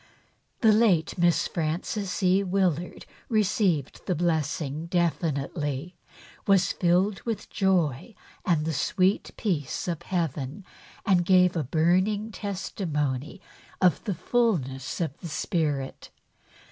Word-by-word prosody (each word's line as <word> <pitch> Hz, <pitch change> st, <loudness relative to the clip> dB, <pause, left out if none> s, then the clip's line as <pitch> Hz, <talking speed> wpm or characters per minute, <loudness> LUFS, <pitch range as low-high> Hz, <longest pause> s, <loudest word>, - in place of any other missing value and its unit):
The 220 Hz, -3 st, +6 dB
late 210 Hz, -7 st, +3 dB
Miss 170 Hz, -2 st, +2 dB
Frances 180 Hz, +5 st, -2 dB
E. 185 Hz, +1 st, +4 dB
Willard 180 Hz, -3 st, -1 dB, 0.2 s
received 195 Hz, -, +1 dB
the 180 Hz, -, +1 dB
blessing 155 Hz, -2 st, -1 dB
definitely, 160 Hz, -2 st, -1 dB, 0.5 s
was 195 Hz, -2 st, +4 dB
filled 185 Hz, +3 st, +1 dB
with 230 Hz, -3 st, -4 dB
joy 190 Hz, -, +1 dB, 0.3 s
and 160 Hz, -4 st, +1 dB
the 160 Hz, -, -1 dB
sweet 185 Hz, +7 st, +1 dB
peace 165 Hz, -, -2 dB
of 170 Hz, -3 st, -2 dB
Heaven 165 Hz, 0 st, -3 dB, 0.4 s
and 185 Hz, -5 st, +4 dB
gave 180 Hz, 0 st, +4 dB
a 160 Hz, -, 0 dB
burning 185 Hz, -, +1 dB
testimony 165 Hz, -, -3 dB, 0.4 s
of 180 Hz, -2 st, +3 dB
the 200 Hz, -5 st, -1 dB
fulness 155 Hz, -, 0 dB
of 160 Hz, -5 st, -2 dB
the 170 Hz, -, -7 dB
Spirit. 150 Hz, -5 st, -2 dB
175 Hz, 110 wpm, -27 LUFS, 155-195 Hz, 0.5 s, The